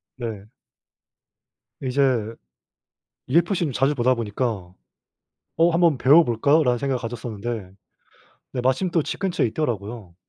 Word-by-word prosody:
네. 110 -5 -6 1.4
이제 125 -4 +1 1.0
UFC를 170 +1 +2
자주 135 +5 +1
보다 130 0 +3
보니까 105 -4 -3 0.8
'어 165 +2 +4
한번 165 -3 +3
배워볼까?'라는 140 -1 +4
생각을 135 0 -1
가졌었는데 115 -3 -5 0.8
근데 125 - -2
마침 130 +8 +1
또 165 - +2
집 - - -5
근처에 190 -9 +1
있더라고요. 110 - -4
125 Hz, 260 characters per minute, -23 LUFS, 115-150 Hz, 1.4 s, 어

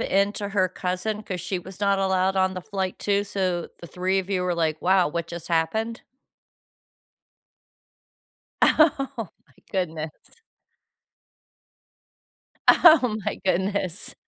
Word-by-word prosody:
into 200 +1 0
her 190 -2 +2
cousin, 185 +4 -3
'cause 185 -4 -5
she 185 +3 -3
was 190 +2 -11
not 200 -1 +2
allowed 190 0 +1
on 190 0 +2
the 185 - -4
flight, 190 -1 -4
too? 205 0 +1
So, 185 -3 -2
the 170 - -10
3 185 +3 -1
of 190 0 -3
you 185 -2 0
were 180 -1 0
like, 160 -2 -1
"Wow, 185 -2 +4
what 170 +2 -3
just 170 0 -7
happened?" 220 +8 -1 2.6
Oh 280 -4 +4 0.4
my 130 - -28 0.2
goodness. 160 -4 -2 2.6
Oh 265 -10 +6
my - - -2
goodness. 190 0 -1
190 Hz, 120 wpm, -24 LUFS, 180-200 Hz, 2.6 s, Oh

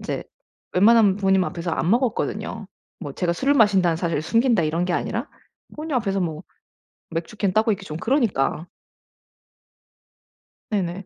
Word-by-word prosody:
이제 - - -4 0.5
웬만하면 205 0 +5
부모님 190 -2 +2
앞에서 170 -1 -4
안 165 - -1
먹었거든요. 220 -4 -1 0.3
뭐 145 -6 -6
제가 170 +2 -1
술을 275 +10 +1
마신다는 190 - +4
사실을 165 -3 -1
숨긴다 230 +2 +2
이런 165 +3 0
게 180 - -1
아니라 235 - -2 0.5
부모님 305 -1 -5
앞에서 195 -5 -1
뭐 160 -1 -3 0.7
맥주 165 +5 -5
캔 200 -3 0
따고 220 +2 +2
있기 200 - -5
좀 155 - -6
그러니까. 215 - 0 2.0
네네. 190 -2 -2
195 Hz, 325 characters per minute, -23 LUFS, 170-225 Hz, 2.0 s, 웬만하면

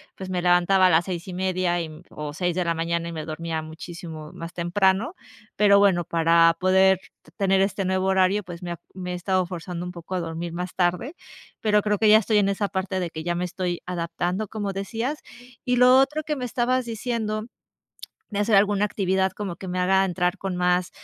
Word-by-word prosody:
pues, 190 -1 -7
me 180 -1 -1
levantaba 180 +2 +4
a - - +4
las 170 0 +3
6 175 -2 -5
y 185 - -6
media, 185 -1 0
y 170 - -2
em, 155 +2 -12
o 150 -1 -6
6 175 +1 -1
de 180 - 0
la 170 - +1
mañana 170 +1 -2
y - - -5
me 155 -2 -5
dormía 160 0 -4
muchísimo 160 -1 -9
más 165 0 -7
temprano. 190 - +1 0.4
Pero 200 -1 +5
bueno, 190 -4 +4
para 165 0 +4
poder 190 0 +4 0.2
te 155 - -21
tener 195 +1 +2
este 195 -1 0
nuevo 190 0 0
horario, 190 +2 +2
pues, 175 -1 -9
me 175 -1 -5
ha 170 - -6
me 180 -1 -5
he - - -2
estado 185 +1 0
forzando 175 0 -6
un 180 - -5
poco 170 +2 -6
a 180 - 0
dormir 165 0 -4
más 180 +1 -4
tarde, 180 - 0 0.5
pero 210 -1 +3
creo 210 -1 0
que 215 -1 +4
ya 215 - +9
estoy 215 0 +1
en 200 -1 +2
esa 200 +1 0
parte 190 0 -2
de 175 -2 -2
que 160 0 -6
ya 175 0 -1
me 180 +1 -1
estoy 175 -1 -3
adaptando, 180 +3 -2
como 205 -3 -3
decías. 230 +9 -3 0.4
Y 250 0 +1
lo 250 +1 +7
otro 300 +3 +1
que 300 0 -2
me 255 - -5
estabas 250 +1 0
diciendo 220 -2 -3 0.9
de 200 - -3
hacer 210 +1 +2
alguna 205 +1 +3
actividad 190 -2 0
como 195 -4 -5
que 190 - -8
me 185 - -3
haga 190 +1 +3
entrar 180 0 -1
con 190 -2 -3
más, 180 0 +1
185 Hz, 220 wpm, -24 LUFS, 175-200 Hz, 0.9 s, ya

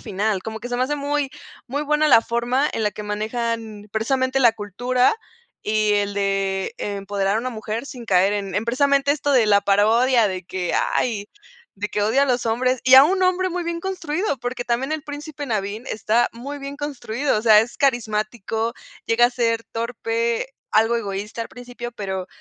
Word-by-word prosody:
final, 200 -1 -1
como 220 0 -5
que 245 - -6
se 245 - -2
me 255 - +2
hace 295 - -1
muy 285 -1 -1 0.4
muy 285 +4 -2
buena 300 +1 +2
la 230 - +7
forma 245 +5 0
en 220 - -1
la 210 - +1
que 210 - -7
manejan 220 0 -3
precisamente 260 +4 0
la 240 -4 +5
cultura 245 - +1 0.5
y 215 0 +2
el 205 0 0
de 195 -1 -1
empoderar 200 0 -1
a - - +1
una 255 +2 -3
mujer 225 +2 -5
sin 250 -5 -9
caer 195 -1 +3
en 200 -2 -3
en 210 - 0
precisamente 280 +3 +2
esto 290 -1 -1
de 240 -5 +4
la 200 -1 +5
parodia 220 +4 +3
de 185 -2 -4
que: 180 -1 -3 0.2
"Ay", 210 -4 -1 0.5
de 210 - -2
que: 205 - -1
"Odia 235 +7 +3
a - - +3
los 245 -2 0
hombres 255 +2 +1
y 260 - +6
a 265 +1 +10
un 375 +3 +1
hombre 370 0 +2
muy 355 0 -3
bien 340 0 -3
construido", 360 -3 -2
porque 245 +1 -4
también 245 +4 -1
el 310 -1 -3
Príncipe 290 -1 -7
Nabín 215 +1 -3
está 220 +2 +1
muy 280 +5 -7
bien 280 +1 -7
construido. 280 -4 -2
O 215 - -4
sea, 215 -2 +7
es 235 +2 -4
carismático, 225 -2 -1 0.3
llega 240 +1 +4
a - - -3
ser 230 -2 0
torpe, 230 +1 -2 0.2
algo 225 +2 +3
egoísta 210 +1 -4
al - - -8
principio, 245 -1 -8
pero, 190 -4 -4
235 Hz, 195 wpm, -22 LUFS, 210-265 Hz, 0.5 s, a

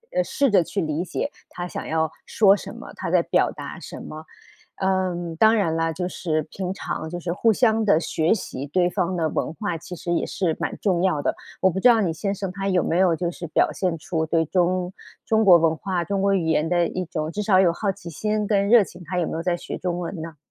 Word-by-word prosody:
呃， - - +3
试 280 - +1
着 190 -4 +5
去 200 - -4
理 155 -1 -1
解 280 +9 -3 0.2
他 175 0 -5
想 - - -6
要 160 0 0 0.2
说 200 -3 +5
什 205 - -7
么、 - - -10
他 - - -4
在 - - +3
表 - - +2
达 - - -8
什 - - -9
么。 155 +1 -9 0.5
嗯， 185 -3 -1
当 220 +4 +5
然 180 -7 +1
了， 165 0 0
就 180 +2 -3
是 155 -4 -2
平 185 -1 -4
常 175 -4 -4
就 175 +1 -5
是 170 0 -3
互 225 +5 +3
相 225 0 +3
地 200 -7 +4
学 160 -1 0
习 140 -9 -6
对 175 +4 +2
方 185 -1 -1
的 165 -2 +1
文 155 - -2
化 200 -3 -3
其 170 +2 -8
实 175 +1 -3
也 170 - +1
是 170 -4 -1
蛮 - - -3
重 185 -4 +1
要 185 -5 +2
的。 - - 0 0.3
我 190 - +4
不 190 - -3
知 250 - +6
道 235 -2 +5
你 180 -6 +1
先 195 +5 -2
生 195 -1 -4
他 195 +1 -4
有 185 -3 +2
没 170 - 0
有 180 -3 +4
就 175 +1 -2
是 175 0 -7
表 155 - +2
现 180 -3 -1
出 160 +1 -2
对 165 0 +2
中 180 +2 0 0.3
中 220 0 +3
国 185 -4 +8
文 165 -1 +2
化、 180 +1 -2
中 195 +3 -1
国 200 0 +2
语 180 -4 0
言 160 0 +1
的 175 -1 +2
一 185 +2 -4
种 155 -1 -3
至 210 - -3
少 195 -2 +4
有 185 -2 +5
的 - - 0
好 200 +3 -1
奇 170 -2 -10
心 210 +5 -1
跟 200 -1 +1
热 235 -2 +7
情？ 180 -1 -12
他 180 +2 -4
有 175 - +1
没 - - -4
有 160 - -2
在 175 0 0
学 - - -6
中 175 -1 -2
文 175 -1 -5
呢？ 160 -1 -8
180 Hz, 275 characters per minute, -23 LUFS, 165-195 Hz, 0.5 s, 国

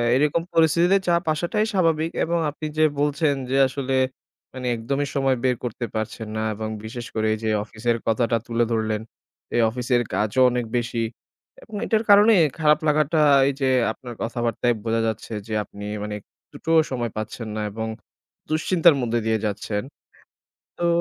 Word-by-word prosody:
এরকম 150 +4 +2
পরিস্থিতিতে 170 +4 +4
চাপ 170 -1 +2
আসাটাই 175 +7 0
স্বাভাবিক 165 -3 +1
এবং 170 +1 0
আপনি 150 +2 -7
যে 155 - +4 0.2
বলছেন, 145 +1 +2 0.2
যে 135 - +2
আসলে 135 0 -2 0.6
মানে 130 -1 -5
একদমই 140 +5 -2
সময় 135 -1 +2
বের 130 -1 +2
করতে 120 0 -3
পারছেন 110 0 -4
না - - -1
এবং 110 +1 -4 0.2
বিশেষ 120 +2 -6
করে 110 0 +1
এই - - -2
যে 110 - 0
অফিসের 115 +2 -2
কথাটা 115 +1 +2
তুলে 115 0 +1
ধরলেন। 110 -1 0 0.5
এই 120 - +4
অফিসের 125 +1 0
কাজও 110 +5 +1
অনেক 120 -1 -1
বেশি 120 -1 -1 0.6
এবং 220 - -11
এটার 220 -1 +1
কারণে 205 +2 +7 0.3
খারাপ 150 -1 +4
লাগাটা, 150 +1 +2 0.3
এই 140 - +1
যে 135 - +2 0.2
আপনার 120 +2 -9
কথাবার্তায় 120 +1 0
বোঝা 115 0 0
যাচ্ছে। 110 +1 -4
যে 110 - -5
আপনি 100 0 -10 0.2
মানে 105 0 -4
একটু - - -18
টো 165 - 0 0.2
সময় 120 -3 -2
পাচ্ছেন 110 +1 -5
না 110 - -2
এবং 110 +2 -4 0.6
দুশ্চিন্তার 160 +1 +4
মধ্য 120 -2 -2
দিয়ে 110 0 +1
যাচ্ছেন। 105 0 -3 1.0
তো - - +3
125 Hz, 165 wpm, -23 LUFS, 110-155 Hz, 1.0 s, কারণে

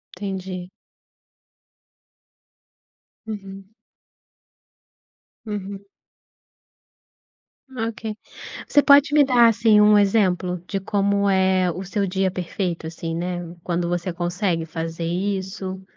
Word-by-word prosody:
Entendi. 185 -2 -5 2.6
Uhum. 195 -1 -8 1.7
Uhum. 200 -1 -6 2.0
Ok. 220 -1 -5 0.5
Você 290 - +4
pode 285 0 +6
me 295 -1 +6
dar, 245 -3 +5
assim, 225 -1 +4
um 210 0 +6
exemplo 185 -4 +1
de 195 - -2
como 200 0 +1
é 190 -1 +2
o 185 +4 -6
seu 200 +1 -1
dia 190 0 0
perfeito, 180 -2 -4
assim, 165 0 -5
né, 175 +1 -3 0.2
quando 175 0 -1
você 175 +1 -2
consegue 175 -1 -1
fazer 165 +1 -5
isso? 190 +1 -3
190 Hz, 95 wpm, -22 LUFS, 180-205 Hz, 2.6 s, pode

